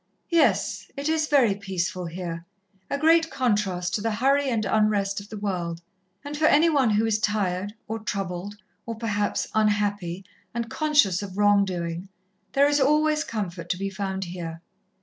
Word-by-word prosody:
"Yes, 335 -1 +2
it 280 +1 -2
is 315 -1 +1
very 265 -8 +4
peaceful 185 -2 -3
here 170 -1 -5 0.5
a 280 - -1
great 325 +2 +4
contrast 205 -8 0
to 210 - 0
the 225 0 -1
hurry 275 +4 +2
and 225 -4 0
unrest 205 -2 +1
of 200 +1 -12
the 215 - -7
world. 180 -5 -3 0.5
And 290 +1 -5
for 310 +1 +1
any 320 +3 +5
one 275 -6 +3
who 215 +1 +2
is 220 -1 +1
tired, 205 -1 -1
or 225 +1 -3
troubled, 195 -1 -4 0.3
or 230 - -3
perhaps 210 -2 -1
unhappy, 205 -4 0 0.3
and 235 -1 -3
conscious 285 - +3
of 195 -2 -7
wrong 205 -1 +4
doing, 175 0 -4 0.4
there 280 +1 +5
is 290 0 +2
always 300 +2 +3
comfort 180 -6 -5
to 180 - 0
be 195 +1 -3
found 190 -1 -3
here. 170 -2 -7
205 Hz, 170 wpm, -25 LUFS, 185-255 Hz, 0.5 s, any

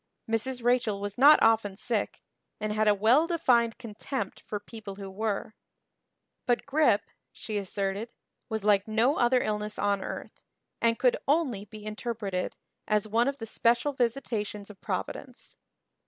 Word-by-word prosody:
Mrs. 235 +2 -1
Rachel 240 -4 +2
was 205 0 -4
not 290 +4 +8
often 220 -3 +3
sick 225 -2 -2 0.4
and 215 0 -2
had 215 0 +1
a 210 - +5
well 240 +11 +4
defined 245 -9 +2
contempt 230 -1 -5
for 210 - -4
people 205 -1 -9
who 195 -1 -8
were; 215 +1 -2 0.9
but 245 -1 +1
grippe, 280 -8 +3 0.3
she 215 -1 -6
asserted, 200 +3 -3 0.4
was 220 -2 -3
like 205 -1 +3
no 230 +6 +2
other 250 +1 +3
illness 210 0 -3
on 200 -1 +1
earth - - -7 0.4
and 230 0 +3
could 250 -2 +3
only 270 -9 +1
be 210 0 -11
interpreted 215 -4 -3 0.3
as 210 0 +1
one 230 +4 +2
of 275 0 -1
the 225 - -6
special 235 +5 +1
visitations 225 -5 -2
of 195 - -18
Providence. 230 +6 -5
220 Hz, 150 wpm, -28 LUFS, 205-245 Hz, 0.9 s, not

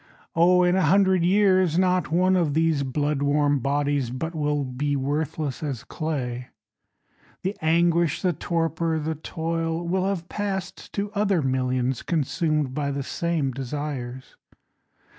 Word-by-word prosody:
Oh 180 +2 +5
in 180 0 +3
a 190 - +3
hundred 185 +1 +4
years 185 -3 +3
Not 185 -1 +2
one 185 +3 +3
of 160 -6 +1
these 160 -2 +2
blood 145 +2 -1
warm 145 0 +2
bodies 140 -1 0
But 145 +7 -4
will 150 -2 0
be 140 +3 -2
worthless 145 +1 -2
as 140 -7 -4
clay. 125 -6 -4 1.0
The 190 +3 -1
anguish, 170 0 +2
the 180 -2 +2
torpor, 165 0 -1
the 160 +1 -2
toil 165 +2 -3
Will 185 +2 +1
have 185 -4 -2
passed 190 -2 -4
to 205 0 -2
other 200 -6 +1
millions 130 -1 0
Consumed 155 -3 0
by 145 0 -1
the 140 0 -2
same 160 -2 -1
desires. 130 -1 -5
160 Hz, 140 wpm, -25 LUFS, 140-175 Hz, 1.0 s, Oh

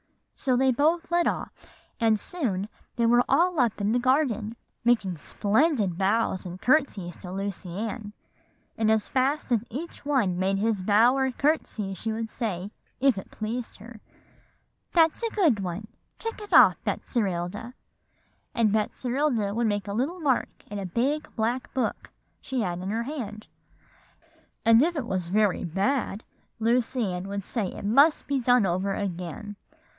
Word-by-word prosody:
So 255 -2 +1
they 265 +1 +4
both 325 +7 +1
led 345 0 +3
off; - - -2 0.5
and 220 -2 +3
soon 205 - -2 0.3
they 235 - +1
were 240 +1 +5
all 350 -1 +3
up 235 -5 +2
in 205 +1 +1
the 245 - +2
garden, 255 -2 +2
and 220 +2 -6 0.3
making 220 -7 +2
splendid 210 - +1
bows 195 0 +1
and 180 +1 -8
courtesies 230 - +1
to 180 - -9
Lucy 195 -1 -4
Ann. 210 -1 -4 0.6
And 220 -1 +1
as 220 -1 +2
fast 270 +2 0
as 230 -3 +2
each 310 +9 -7
one 240 -12 +1
made 195 +1 +1
his 210 -1 0
bow 220 +6 +4
or 265 -1 +1
courtesy, 245 -8 0
she 220 +4 -3
would 225 0 -4
say, 205 -5 -3 0.3
if 260 -6 +3
it - - -11
pleased 225 +2 -5
her, 225 +2 -12 0.9
'That's 325 +2 +4
a 460 - 0
good 330 - +2
one, 190 +2 -4 0.3
check 455 -1 -5
it 415 - -10
off, - - +7
Betserilda;' 210 +2 -2 0.8
and 225 -3 +3
Betserilda 240 0 0
would 235 +1 +1
make 205 -2 -1
a 200 - -3
little 280 - -1
mark 280 -6 +1 0.2
in 205 - -3
a 195 - -4
big 270 - -1
black 235 +3 -1
book 260 - -2 0.3
she 260 -2 -2
had 175 -4 -2
in 185 +1 -4
her 225 +3 -1
hand. 225 -6 -6 1.2
And 230 +1 +7
if 340 +4 +2
it 285 -6 -2
was 185 -6 -2
very 205 +1 +2
bad, 200 - -1 0.4
Lucy 235 -2 +1
Ann 180 +2 -4
would 200 0 -4
say 215 0 -2
it 200 - -7
must 280 +9 +4
be 280 -1 0
done 245 -3 +4
over 190 +2 0
again. 195 +2 -5
225 Hz, 165 wpm, -26 LUFS, 200-260 Hz, 1.2 s, off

